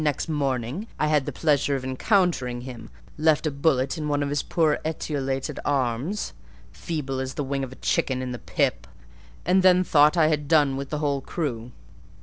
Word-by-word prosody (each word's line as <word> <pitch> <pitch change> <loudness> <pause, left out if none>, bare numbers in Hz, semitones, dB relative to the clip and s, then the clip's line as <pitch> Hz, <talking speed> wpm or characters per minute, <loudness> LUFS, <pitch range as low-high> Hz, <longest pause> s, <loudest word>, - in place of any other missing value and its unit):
Next 150 0 0
morning 140 - -2
I - - +1
had 150 -3 +2
the - - -1
pleasure 145 -3 +1
of 135 - -4
encountering 130 - +1
him; 120 -3 -9 0.3
left 155 0 +3
a 155 - +1
bullet 140 +1 +1
in 150 - -3
one 145 -1 +1
of 140 - -2
his 145 -1 0
poor 160 -3 +1
etiolated 140 -4 -3
arms, 140 - -1 0.4
feeble 140 -6 -4
as 130 0 -4
the 145 - -2
wing 135 0 -2
of 130 - -5
a - - -10
chicken 130 0 0
in 130 -1 -4
the 125 - -5
pip, - - -1 0.6
and 185 +2 +4
then 185 0 +5
thought 150 0 +4
I 160 - +5
had 150 -2 -1
done 145 -3 +4
with 140 0 -5
the 150 - -2
whole 145 -2 0
crew. 125 -6 -4
145 Hz, 190 wpm, -25 LUFS, 130-155 Hz, 0.6 s, then